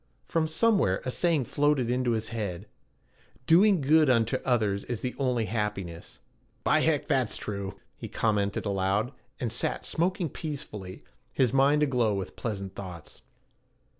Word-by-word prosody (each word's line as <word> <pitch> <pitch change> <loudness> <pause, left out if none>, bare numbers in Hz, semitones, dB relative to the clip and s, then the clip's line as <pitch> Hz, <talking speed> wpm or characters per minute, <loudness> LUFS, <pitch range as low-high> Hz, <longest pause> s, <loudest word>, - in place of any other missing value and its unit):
From 160 -1 +1
somewhere 160 - +2
a 125 - -1
saying 160 -3 +1
floated 145 -2 +1
into 125 -1 +1
his 110 -1 -2
head: 100 -5 -4 0.8
'Doing 185 +3 +5
good 155 +1 +4
unto 115 +1 +3
others 105 -6 +1
is 120 -3 -4
the 125 - -2
only 125 -4 +1
happiness.' 105 -6 -4 0.5
'By - - +4
heck, - - +1
that's - - +1
true,' 100 -2 -5 0.2
he - - -7
commented 105 -3 0
aloud, 100 +4 0 0.3
and 120 -3 -2
sat 120 - -1
smoking 175 +1 0
peacefully, 135 - -7 0.3
his 130 -2 +1
mind 140 +2 +4
aglow 120 -7 +2
with 95 -2 -5
pleasant 100 -4 -4
thoughts. 90 -5 -9
120 Hz, 140 wpm, -28 LUFS, 100-145 Hz, 0.8 s, Doing